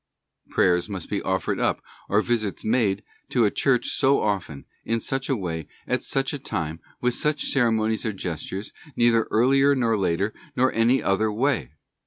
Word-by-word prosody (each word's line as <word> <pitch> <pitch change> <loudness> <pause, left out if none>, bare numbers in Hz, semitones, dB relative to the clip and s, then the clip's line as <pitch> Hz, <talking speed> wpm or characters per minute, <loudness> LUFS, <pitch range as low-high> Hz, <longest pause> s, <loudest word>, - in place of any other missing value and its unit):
Prayers 90 +1 +2
must 95 -3 -6
be 100 - 0
offered 95 0 -1
up, - - +1 0.3
or 105 +2 +3
visits 110 -4 -1
made 110 -3 +1 0.3
to 120 -3 +3
a 105 - +2
church 135 -3 +1
so 140 0 +3
often, 95 -9 -2 0.2
in 115 0 0
such 135 +4 -3
a 135 - +2
way, 80 - -4 0.2
at 125 -1 0
such 135 +1 -1
a 145 - -4
time, 80 -8 -3 0.2
with 125 0 +2
such 150 +3 0
ceremonies 110 -4 +1
or 110 - 0
gestures, 95 +1 -5 0.2
neither 115 -1 +3
earlier 135 +5 +4
nor 115 -4 +2
later, 95 +1 0 0.2
nor 130 +1 +3
in 115 - 0
any 130 +2 +3
other 105 +2 +1
way. 125 - 0
110 Hz, 175 wpm, -24 LUFS, 95-125 Hz, 0.3 s, earlier